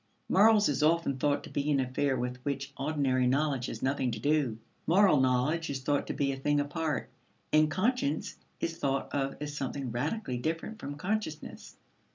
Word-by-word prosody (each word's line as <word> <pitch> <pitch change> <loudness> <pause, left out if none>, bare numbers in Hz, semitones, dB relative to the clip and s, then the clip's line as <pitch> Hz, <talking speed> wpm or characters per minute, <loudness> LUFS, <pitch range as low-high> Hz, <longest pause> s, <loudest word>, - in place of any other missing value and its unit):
Morals 210 +1 +5
is 140 -2 0
often 155 -3 +2
thought 145 +1 +1
to - - -10
be 145 +1 -1
an 140 -2 +3
affair 130 +1 0
with 125 +1 -3
which 140 +1 -4
ordinary 135 -3 +1
knowledge 135 -1 +1
has 115 - -6
nothing 130 -1 +1
to - - -4
do. 145 -7 +1 0.3
Moral 185 -3 +5
knowledge 130 +6 +1
is 135 -1 -3
thought 145 +1 0
to - - -2
be 140 -1 0
a 135 - -4
thing 145 +2 +1
apart, 145 -1 -2 0.5
and 155 0 +5
conscience 185 - 0 0.2
is 165 - -2
thought 135 -3 -1
of 135 -1 -1
as 150 0 -5
something 135 -2 -3
radically 130 - -2
different 165 - -3
from 145 - -6
consciousness. 180 -1 -4
145 Hz, 180 wpm, -30 LUFS, 135-155 Hz, 0.5 s, Morals